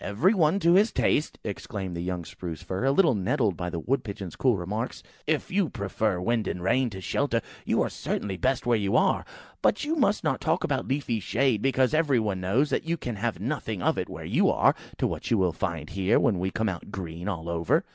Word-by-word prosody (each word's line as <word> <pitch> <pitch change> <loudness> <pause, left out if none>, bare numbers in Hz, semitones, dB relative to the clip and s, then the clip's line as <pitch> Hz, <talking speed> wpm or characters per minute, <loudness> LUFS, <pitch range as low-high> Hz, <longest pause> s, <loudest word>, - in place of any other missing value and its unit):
"Every 140 - +2
one 170 -2 +3
to 170 +1 +5
his 205 +5 +5
taste," 150 - +1
exclaimed 100 -3 -5
the 85 - -3
young 90 -1 -3
Spruce 85 -2 -7
fir, 95 +7 -2
a 135 - +4
little 165 0 +4
nettled 105 - +1
by 90 +2 -3
the 85 -1 -4
Wood 135 +11 0
pigeons' 100 -5 -6
cool 125 -5 +2
remarks; 105 +7 -4 0.2
"if 155 -1 0
you 190 -4 +2
prefer 100 -1 -1
wind 115 +3 0
and 90 - -3
rain 125 +6 +2
to 95 -3 -8
shelter, - - 0 0.3
you - - +3
are - - 0
certainly 100 -2 -3
best 130 +7 0
where 120 -2 +3
you 100 -1 0
are. - - +3 0.4
But 210 - +2
you 315 +2 0
must 260 -9 +2
not - - 0
talk - - +1
about - - -1
leafy 130 -4 -1
shade, 115 +2 +1
because 130 0 +2
every 150 -5 +3
one 100 -4 -1
knows 120 +11 +1
that - - 0
you 170 - +1
can 120 -8 -5
have 115 -2 -2
nothing 110 -4 -3
of - - +2
it - - -3
where - - -7
you - - +3
are, - - +4 0.2
to - - 0
what - - -3
you 115 - +3
will 95 -3 +2
find 80 -3 -3
here, 95 0 +2
when 100 -6 +2
we 95 +1 0
come 110 +3 -1
out 95 -2 -4
green 85 -1 -6
all 85 -5 -3
over." 85 -1 +1
105 Hz, 230 wpm, -27 LUFS, 90-135 Hz, 0.4 s, to